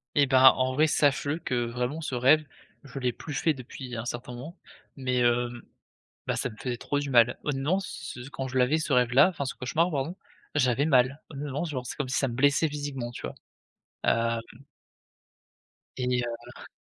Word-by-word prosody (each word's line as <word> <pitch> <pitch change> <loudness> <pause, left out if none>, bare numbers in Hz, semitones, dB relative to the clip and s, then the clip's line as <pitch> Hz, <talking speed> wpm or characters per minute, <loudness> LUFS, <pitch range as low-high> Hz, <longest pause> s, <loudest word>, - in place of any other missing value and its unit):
Et 145 - +5
ben, 130 -1 +4
en 130 0 0
vrai, 155 +4 +4
sache-le 145 +1 +1
que 125 -7 -1
vraiment 125 +6 -3
ce 140 -4 -3
rêve, 140 +5 +4 0.4
je 140 -1 -8
l'ai 125 -1 +1
plus 150 - -8
fait 160 +3 +2
depuis 125 -1 -8
un 110 +1 -4
certain 120 0 -5
moment. 150 +9 -9 0.4
Mais, 130 -2 -1
hem, 120 0 +1 0.7
bah - - 0
ça 125 - -1
me 110 - -13
faisait 125 +2 -3
trop 145 +4 -2
du 145 -1 -3
mal. 120 -1 +5
Heu, - - +2
non, 150 +8 0
ce 155 -7 -7
ce 135 - -10
quand 135 -1 -4
je 130 +1 -1
l'avais 130 +5 +3
ce 150 -2 -2
rêve-là, 125 +5 +5
enfin 155 -6 -4
ce 130 - -4
cauchemar 160 +7 0
pardon, 150 +2 -2 0.4
j'avais 135 -1 +2
mal. 130 0 +3
Honnêtement 145 +1 -4
genre, 130 -7 -4
c'est - - -5
comme 145 -3 -3
si 130 - 0
ça 135 - +1
me 120 - -5
blessait 145 +4 +3
physiquement 145 -4 -4
tu - - -9
vois? - - -5 0.7
Hem 115 0 +1 1.6
et 125 -1 -1
heu 120 +1 -8
130 Hz, 195 wpm, -27 LUFS, 125-145 Hz, 1.6 s, Et